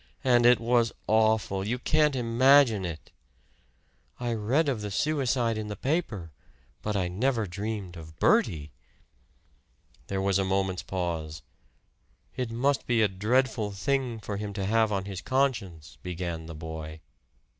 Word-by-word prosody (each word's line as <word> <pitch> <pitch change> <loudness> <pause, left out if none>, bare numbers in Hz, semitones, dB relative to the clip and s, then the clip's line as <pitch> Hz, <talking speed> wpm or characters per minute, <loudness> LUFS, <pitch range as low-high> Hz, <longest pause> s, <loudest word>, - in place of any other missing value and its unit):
"And 120 -2 +5
it 125 0 +6
was 115 0 +2
awful! 110 -3 +2
You 115 +5 -1
can't 150 +3 +2
imagine 120 -3 +4
it!" 80 -4 -7 1.1
"I 120 -1 -1
read 120 +9 +1
of 125 -6 -1
the 105 - -4
suicide 125 -2 0
in 105 - -4
the 105 - -5
paper. 115 - -2 0.5
But 105 0 -2
I 90 -2 0
never 115 +5 0
dreamed 100 -1 -5
of 80 -1 -11
Bertie!" 75 -2 +2 1.4
There 95 - -2
was 100 0 +1
a - - +2
moment's 95 -1 0
pause. 80 -4 -4 0.9
"It 125 -2 -2
must 130 +5 0
be 115 -2 +3
a - - +5
dreadful 110 +3 0
thing 130 +2 -1
for 100 -1 -5
him 105 0 -5
to 100 -1 -3
have 110 +1 +2
on 95 -2 -1
his 95 -3 -6
conscience" 105 - -1
began 85 -2 -5
the 80 - -8
boy. 80 0 -7
105 Hz, 145 wpm, -28 LUFS, 95-120 Hz, 1.4 s, it